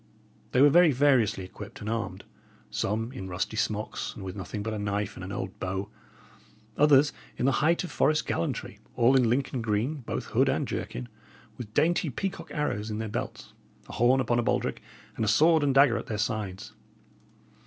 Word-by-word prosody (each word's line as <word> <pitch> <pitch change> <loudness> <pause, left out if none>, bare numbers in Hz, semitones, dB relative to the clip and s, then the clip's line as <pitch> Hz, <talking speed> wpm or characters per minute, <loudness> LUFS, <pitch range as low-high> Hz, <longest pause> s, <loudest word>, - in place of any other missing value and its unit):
They 130 - +5
were 145 - +7
very 175 0 +6
variously 125 -7 +3
equipped 100 +2 -10
and 105 - -7
armed; 110 -4 -3 0.5
some 110 - -1
in 95 -8 -7
rusty 90 +4 -3
smocks, 110 -1 -2
and 100 - -8
with 95 0 -6
nothing 100 +1 -5
but 110 +1 -3
a 105 - -3
knife 100 0 -2
and - - -8
an 95 - -6
old 95 -1 -5
bow; 95 +2 -3 0.8
others 145 0 +5 0.2
in - - 0
the 135 - +4
height 170 +3 +3
of 175 - -6
forest 155 +1 +2
gallantry, 85 - -3 0.2
all 120 +3 +4
in 125 -3 +4
Lincoln 130 0 0
green, 115 +7 0
both 130 - -4
hood - - +4
and - - 0
jerkin, - - -4 0.5
with 110 -3 -9
dainty 165 +1 +2
peacock 190 +9 -4
arrows 115 -8 -2
in 105 - -3
their 110 0 -3
belts, - - -5 0.3
a - - -10
horn 125 +3 +4
upon 120 -1 +1
a - - +3
baldrick, - - -1 0.3
and - - -2
a - - 0
sword 155 +9 +5
and 140 -2 +1
dagger 135 -4 +6
at - - -6
their 105 - -3
sides. 105 -3 -3
115 Hz, 190 wpm, -28 LUFS, 105-140 Hz, 0.8 s, were